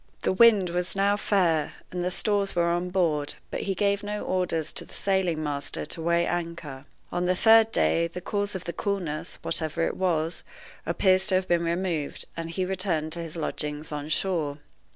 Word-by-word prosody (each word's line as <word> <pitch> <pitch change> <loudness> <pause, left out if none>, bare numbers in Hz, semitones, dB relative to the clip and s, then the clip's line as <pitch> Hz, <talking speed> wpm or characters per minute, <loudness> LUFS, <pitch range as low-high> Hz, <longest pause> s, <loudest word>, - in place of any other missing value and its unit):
The - - +2
wind 200 -4 +6
was 180 +2 +1
now 200 +1 +3
fair, 175 -7 +1 0.2
and 180 0 -2
the 180 - +1
stores 200 +1 0
were 170 0 +2
on 175 +1 -1
board, 160 -6 0 0.2
but - - -3
he 195 - -1
gave 200 +1 +1
no 210 0 -4
orders 170 -4 0
to - - 0
the - - -12
sailing 185 -5 0
master 145 -1 -2
to 165 - -6
weigh 170 +1 +2
anchor. 170 -6 -4 0.3
On 175 0 0
the 185 - +3
third 225 +2 +6
day, 170 -5 +2
the 180 - -7
cause 205 +2 -2
of 185 - -4
the 170 - -4
coolness, 175 -6 -3
whatever 165 0 -1
it - - -2
was, 165 -3 0 0.5
appears 190 0 +3
to 190 - +3
have 185 0 +1
been 170 -1 +2
removed, 170 -3 -2
and 165 0 -4
he 185 +3 -1
returned 180 -4 -1
to 170 - -2
his 165 -1 -6
lodgings 150 -1 -3
on 150 0 -4
shore. 160 -4 -1
175 Hz, 195 wpm, -27 LUFS, 160-190 Hz, 0.5 s, wind